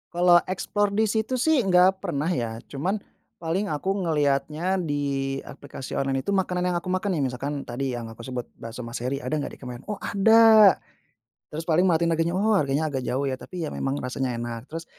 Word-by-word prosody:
Kalau 175 0 +5
explore 200 +2 -1
di 220 +2 +2
situ 220 +4 -1
sih, 300 0 +3
nggak 190 0 +4
pernah 160 -5 -1
ya. 115 -10 -2
Cuman, 185 +10 -2 0.4
paling 175 +4 -1
aku 190 +6 -1
ngelihatnya 155 0 0
di 140 -5 -1
aplikasi 135 -1 -9
online 135 -1 0
itu, 200 +9 -1
makanan 180 -1 0
yang 180 - 0
aku 175 +1 -3
makan 185 0 0
nih, 150 - 0
misalkan 140 +3 -4
tadi 125 +1 -3
yang 115 -1 -6
aku 115 - -15
sebut, 125 +1 -5 0.2
Bakso 115 +2 -7
Mas 115 0 -6
Hery, 130 +3 -3
"Ada 150 +5 -1
nggak 145 - -5
di - - -22
komen?" 125 -1 -8
"Oh 210 - -2
ada." 220 -1 +7 0.7
Terus 160 +2 -6
paling 175 +3 +3
merhatiin 170 0 +2
harganya, 165 +1 0
"Oh, 215 +3 +2
harganya 145 +2 0
agak 135 - -1
jauh 135 +3 0
ya, 130 -2 -2
tapi 180 -3 -6
ya 155 - -4
memang 135 +1 -2
rasanya 125 -1 -2
enak." 120 +1 -6
Terus 165 +1 -6
160 Hz, 200 wpm, -25 LUFS, 135-185 Hz, 0.7 s, ada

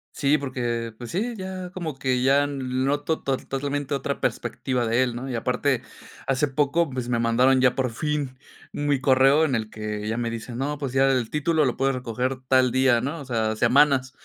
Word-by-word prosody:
Sí, 145 +1 +2
porque, 120 -4 -3
pues 120 -2 -8
sí, 225 +7 -1
ya 185 -2 -6
como 170 -5 -4
que 130 -1 0
ya 140 +2 +4
lo 145 -1 -5
noto 140 +5 -1
tol 135 -1 -2
totalmente 145 +1 -2
otra 140 - -3
perspectiva 125 -2 -1
de 115 +3 +2
él, 120 -2 -3
¿no?, 130 +3 -5
y 125 - -2
aparte, 125 +2 0 0.4
hace 135 +2 +1
poco, 145 +4 +1
pues 125 -2 -4
me 120 -1 0
mandaron 125 +3 +3
ya 125 -1 +4
por 130 -2 0
fin 145 0 -2 0.4
mi 145 -2 0
correo 135 +3 +4
en 145 -5 0
el 110 -2 -2
que 105 -1 -5
ya 110 - -1
me 120 -1 -2
dicen, 115 +1 -6
no, 145 +2 -2
pues 140 -3 -4
ya 135 +1 +4
el 125 -4 0
título 155 +1 +1
lo 125 - 0
puedes 135 0 +1
recoger 125 +1 -3
tal 130 -2 +4
día, 130 -2 +3
¿no?, 145 +6 -4
o - - -8
sea, 110 -4 -1
semanas. 130 +2 +3
130 Hz, 205 wpm, -24 LUFS, 125-145 Hz, 0.4 s, ya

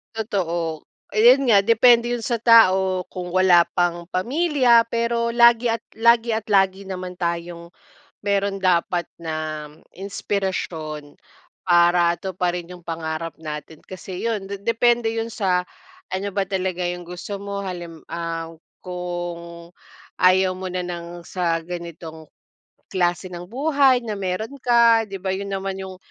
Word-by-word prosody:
Totoo, 170 -7 -2 0.3
eh, 215 - +2
yun 255 +4 +6
nga 205 -3 +6
depende 235 +2 +5
yun 240 -1 -2
sa 240 -4 -1
tao, 190 -6 +5
kung 180 -1 -5
wala 185 -1 +5 0.2
pang 175 0 0
pamilya, 250 - +3
pero 235 0 0
lagi 235 0 +5
at 230 0 -2
lagi 235 0 +3
at 220 0 -4
lagi 195 -1 +3
naman 185 -1 -6
tayong 170 -1 -4 0.5
meron 200 -1 -1
dapat 175 -1 +1
na, 155 -2 -4 0.2
inspirasyon, 180 -6 -4 0.5
para 175 -1 +4
tuparin 180 -2 -3
yung 175 -2 -15
pangarap 165 0 -4
natin. 155 0 -8
Kasi 185 0 -8
yun, 220 -4 -2
de 200 0 -7
depende 230 +1 +2
yun 225 0 -2
sa, 185 -5 0 0.4
ano 190 +2 -2
ba 200 - +1
talaga 185 -2 -2
yung 175 0 -4
gusto 180 +3 -6
mo. 200 0 -4
Halim 175 -3 -7
ah, 165 -1 -4 0.4
kung 175 -1 -6 0.5
ayaw 185 0 +4
mo 190 - -5
na 180 0 -2
ng 175 0 -7
sa 170 -3 -1
ganitong 170 -2 -8 0.7
klase 175 0 0
ng 175 0 -8
buhay, 275 +1 +3
na 220 - -3
meron 200 +7 -3
ka, 235 -2 +5
'di 195 - -6
ba 190 - -4
yun 200 +1 -5
naman 195 0 -3
yung 190 -1 -7
185 Hz, 140 wpm, -22 LUFS, 175-225 Hz, 0.7 s, yun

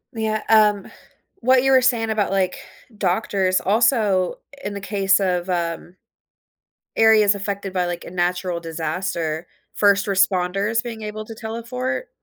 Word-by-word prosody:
Yeah, 220 -1 -2
um, 210 -3 +3 0.5
what 255 +2 +4
you 270 - +3
were 260 -1 +6
saying 235 -3 +1
about, 210 -3 0
like, 190 -2 0 0.4
doctors, 185 -1 +1
also, 210 -4 +2 0.3
in 205 - -4
the 200 - -6
case 200 -1 +2
of, 180 -1 -1
um, 170 0 -3 1.0
areas 220 -2 +5
affected 200 -1 -4
by, 180 -1 0
like, 175 -1 -5
a - - -9
natural 180 0 -1
disaster, 165 0 -3 0.3
first 200 -1 +3
responders 195 +3 +1
being 225 -2 -7
able 215 0 -6
to 225 - -9
teleport, 245 - -4
200 Hz, 135 wpm, -21 LUFS, 185-220 Hz, 1.0 s, were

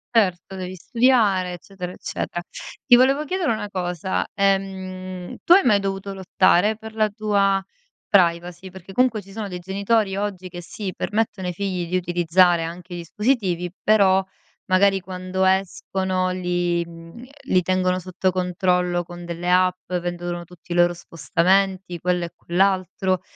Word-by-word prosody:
Certo, 190 -3 +1
devi 185 0 -6
studiare 210 -4 +2
eccetera, 180 0 -8
eccetera. 175 - -5 0.5
Ti 245 - +8
volevo 270 +4 +4
chiedere 360 -2 0
una 215 -2 -2
cosa: 180 0 -2
ehm, 185 -2 -2
tu 345 - +6
hai 390 - +6
mai 210 -5 +4
dovuto 195 0 -4
lottare 190 +2 +3
per 220 0 -10
la 215 -1 +1
tua 200 -2 +1 0.5
privacy? 175 0 +1
Perché 190 +1 -12
comunque 240 -4 +2
ci 195 - -15
sono 210 0 -5
dei 180 -2 -5
genitori 195 +3 0
oggi 195 -2 -4
che 175 0 -8
sì, 190 +1 -6
permettono 210 -3 -2
ai 180 - -2
figli 180 -2 -3
di 185 - +1
utilizzare 175 0 +3
anche 175 +2 -7
i - - -4
dispositivi, 180 - -1
però 195 -3 +4 0.4
magari 195 +1 +3
quando 185 +1 -3
escono 190 0 0
li, 175 -1 -1
mhmm, 165 +7 -12 0.2
li 185 -6 +3
tengono 185 0 +1
sotto 185 +1 -1
controllo 180 -1 0
con 175 0 -10
delle 170 +1 -4
app, 185 0 +2
vedono 175 0 -3
tutti 175 0 -10
i - - -3
loro 175 0 +4
spostamenti, 180 +3 0
quello 180 0 0
e 170 - -7
quell'altro 185 0 0
185 Hz, 150 wpm, -22 LUFS, 175-195 Hz, 0.5 s, Ti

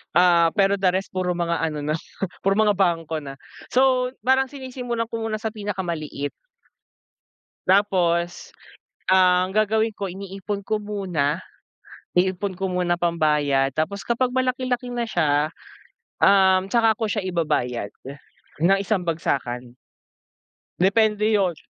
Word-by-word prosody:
Ah, 170 -2 +5
pero 195 0 +4
the 190 -1 +3
rest, 190 +2 -2
puro 180 -1 -1
mga 170 -1 -1
ano 150 -2 -2
na, 155 - 0 0.5
puro 195 +1 +2
mga 215 -1 +4
bangko 165 -5 0
na. 135 -1 -9 0.3
So, 255 -1 +3 0.2
parang 265 +1 +3
sinisimulan 250 -4 -4
ko 230 0 -5
muna 220 -1 -2
sa 220 0 -4
pinakamaliit. 175 -9 -4 1.4
Tapos 180 - +1 0.6
ang 185 0 +4
gagawin 220 +1 +2
ko, 200 - -3
iniipon 195 +2 -6
ko 215 - 0
muna, 185 -7 -1 0.8
iipon 185 +2 +1
ko 190 0 -2
muna 180 -1 0
pambayad, 150 -5 +1
tapos 160 +7 -2
kapag 250 +1 0
malaki-laki 255 -1 -1
na 240 -1 -1
siya, 150 -4 +2 0.7
um, 190 -1 +5
tsaka 225 -2 +4
ko 230 - -1
siya 210 -1 -1
ibabayad, 150 - -1 0.7
ng 195 +3 +5
isang 200 -1 0
bagsakan. 125 -7 -2 1.0
Depende 210 +3 +3
'yon, 190 -5 +2
190 Hz, 125 wpm, -23 LUFS, 170-215 Hz, 1.4 s, Ah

